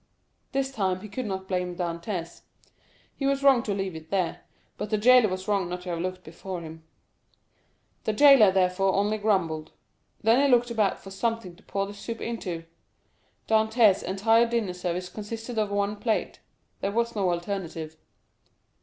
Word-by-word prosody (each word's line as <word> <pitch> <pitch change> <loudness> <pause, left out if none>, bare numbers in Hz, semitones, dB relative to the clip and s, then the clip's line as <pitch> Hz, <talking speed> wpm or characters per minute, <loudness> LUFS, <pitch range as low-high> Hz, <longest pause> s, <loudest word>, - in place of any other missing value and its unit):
This 270 -1 -1
time 190 -6 -1
he 215 - -8
could 225 +3 -4
not 190 -1 -4
blame 180 -1 -2
Dantès. 170 0 -4 0.7
He 275 - -1
was 275 0 0
wrong 270 -4 +6
to 210 - -2
leave 195 -3 -3
it 160 0 -10
there, 190 -3 -1 0.3
but 210 - -5
the 215 - +1
jailer 245 0 +6
was 185 +1 -5
wrong 195 -4 +1
not 180 0 -4
to 180 - -7
have 170 - -3
looked 185 +1 -4
before 180 +3 -7
him. 160 0 -10 1.2
The 215 - +1
jailer, 270 -5 +7
therefore, 190 0 +2
only 210 +2 +1
grumbled. 170 -7 0 0.5
Then 230 +5 +5
he - - +4
looked 245 -1 +3
about 215 -4 +1
for 195 - -12
something 200 -2 -2
to 195 - -21
pour 195 -2 -2
the 200 - -8
soup 225 +3 -6
into; 180 -8 -4 0.8
Dantès' 220 -2 +4
entire 225 +5 +3
dinner 230 -6 -1
service 180 0 -3
consisted 225 +3 -5
of 210 -1 0
one 200 +1 0
plate—there 215 -2 -4
was 235 +2 -1
no 195 -3 +1
alternative. 170 -3 -4
200 Hz, 165 wpm, -26 LUFS, 180-225 Hz, 1.2 s, jailer